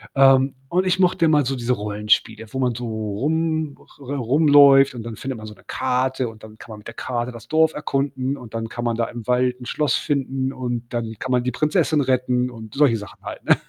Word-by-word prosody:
Ähm, 135 0 +5
und 180 +2 +1
ich 185 0 +2
mochte 180 -2 +3
immer 150 -2 +4
so 135 +2 -1
diese 120 +1 0
Rollenspiele, 105 +1 0
wo 130 - -3
man 125 -2 +1
so 125 +1 -5
rum 145 +9 -1 0.2
re 140 0 -5
rumläuft 140 +1 +6
und 115 - -6
dann 115 -1 -6
findet 135 -2 -5
man 110 - -9
so 105 - -9
'ne - - -22
Karte 130 0 -1
und 110 -1 -15
dann 110 0 -12
kann 115 - -12
man 105 - -8
mit 105 - -13
der 115 - -8
Karte 120 0 -3
das 115 - -12
Dorf 160 0 +3
erkunden 135 -2 -2
und 115 -5 -12
dann 115 0 -3
kann 120 - -5
man 115 - 0
da 115 - +1
im 120 -2 -8
Wald 125 0 +1
'n - - -8
Schloss 150 +3 0
finden 135 -2 -1
und 120 -2 -4
dann 115 -2 -3
kann 130 - -4
man 125 -1 +2
die 125 - -1
Prinzessin 155 +3 +1
retten 125 -1 +1
und 110 -3 -11
solche 135 -5 +4
Sachen 105 0 -11
halt, - - -8
ne? - - +6
125 Hz, 230 wpm, -22 LUFS, 115-140 Hz, 0.2 s, rumläuft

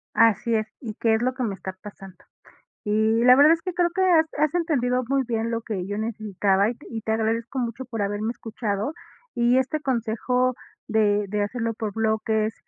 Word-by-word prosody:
Así 230 0 +3
es, 215 -1 +1
y 225 -5 -6
qué 225 -1 +3
es 220 - -1
lo 255 - +1
que 260 - -6
me 210 -4 -2
está 190 0 -7
pasando. 195 -3 -11 0.7
Y 220 +2 +2
la 250 0 +8
verdad 295 +4 +7
es 335 - -2
que 365 -1 -4
creo 350 -1 +1
que 380 - -1
has 345 -4 +5
has 300 -1 +2
entendido 255 -7 +1
muy 275 +1 +2
bien 230 -1 -1
lo 230 0 -2
que 195 -6 -4
yo 205 +1 -4
necesitaba 205 -2 0
y 240 - -4
y 225 -1 -5
te 220 - -3
agradezco 225 +3 -1
mucho 240 +2 -3
por 230 -3 -4
haberme 205 +2 -1
escuchado, 220 +2 -3 0.4
y 240 +1 +3
este 275 +4 -1
consejo 250 -1 0 0.3
de 210 -1 +2
de 210 +1 0
hacerlo 230 +2 -2
por 215 -2 -4
bloques 220 0 0
225 Hz, 200 wpm, -24 LUFS, 215-255 Hz, 0.7 s, la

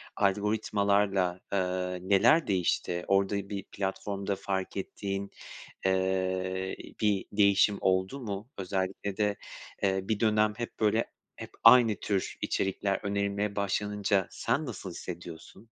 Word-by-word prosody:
algoritmalarla, 100 -2 +1
aaa, 90 -1 -1
neler 100 - +4
değişti? 90 -2 0
Orada 100 0 +1
bir 100 -2 -4
platformda 100 0 -2
fark 95 0 -3
ettiğin, 100 +1 -4 0.5
eee, 95 - +4 0.9
ııı, - - -14
bir 105 -3 +2
değişim 100 0 +4
oldu 95 +7 +1
mu? 105 -2 -5
Özellikle 95 +1 -3
de, 105 -1 +1 0.5
eee, 95 -1 +2
bir 105 +1 -1
dönem 105 -1 +3
hep 120 -1 -6
böyle 110 +1 +2 0.3
hep - - -8
aynı 115 -2 +8
tür 100 -1 -2
içerikler 95 0 0
önerilmeye 100 0 -1
başlanınca 100 -1 0
sen 155 +2 -1
nasıl 100 -6 -6
hissediyorsun? 85 +1 -8
100 Hz, 120 wpm, -29 LUFS, 95-105 Hz, 0.9 s, aynı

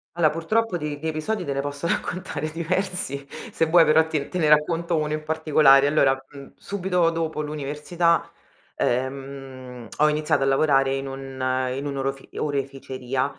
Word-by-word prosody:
Allora 165 -3 +4
purtroppo 185 +7 0
di 150 -3 -4
di 160 - -4
episodi 175 +6 -2
te 140 - -2
ne 140 - -1
posso 145 +3 -4
raccontare 165 -4 -3
diversi 165 -4 -2 0.3
se 165 - +2
vuoi 165 0 +6
però 160 +1 +5
ti 150 -3 -2
te 180 - -5
ne 155 -3 +3
racconto 165 +3 +2
uno 150 0 -1
in 155 0 -3
particolare. 155 -3 +4
Allora, 135 -3 +3
mhmm, 140 -1 -11
subito 180 -3 0
dopo 160 -2 -2
l'università, 150 +3 -1 0.5
ehm, 130 -1 -4
ho 150 +1 +4
iniziato 150 -2 +1
a - - +2
lavorare 135 -1 +3
in 135 0 -4
un 130 -1 -2
in 135 +2 -4
un 140 -1 -3
orofi 135 0 -3
oreficeria, 135 -2 -2
150 Hz, 160 wpm, -24 LUFS, 135-165 Hz, 0.5 s, vuoi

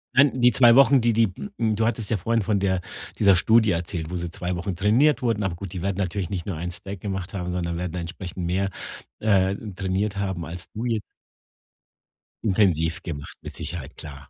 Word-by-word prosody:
Nein, 130 -2 +4
die 125 0 +6
2 120 -1 +6
Wochen, 135 0 +6
die 115 0 +2
die 115 0 +4
d 205 - -7
m 110 -2 +1
du 110 +1 +1
hattest 115 -2 -1
ja 115 - +1
vorhin 115 +5 0
von 100 0 +1
der 95 -2 +1 0.4
dieser 100 -2 +6
Studie 110 +4 +4
erzählt, 85 -2 -3
wo 90 - -4
sie 85 -1 -3
2 90 +1 -3
Wochen 90 +2 -3
trainiert 115 - +3
wurden. 115 -4 0
Aber 95 -3 -1
gut, 95 0 -7
die 90 - -5
werden 100 -1 -1
natürlich 95 -2 -2
nicht 90 -3 -3
nur 95 - -2
1 90 +2 -4
Stack 95 +1 -7
gemacht 95 -2 -4
haben, 90 -1 -3
sondern 85 -1 -2
werden 90 -1 -4
entsprechend 90 +1 -5
mehr, 95 +3 0 0.5
äh, 95 -3 +3 0.2
trainiert 95 +1 -1
haben 95 -4 -2
als 85 +1 -5
du 110 +3 -5
jetzt 115 -3 0 1.4
Intensiv 90 -6 +2
gemacht, 75 -5 -7
mit - - -8
Sicherheit, 85 -7 -7
klar. 70 -2 -10
95 Hz, 205 wpm, -24 LUFS, 90-110 Hz, 1.4 s, die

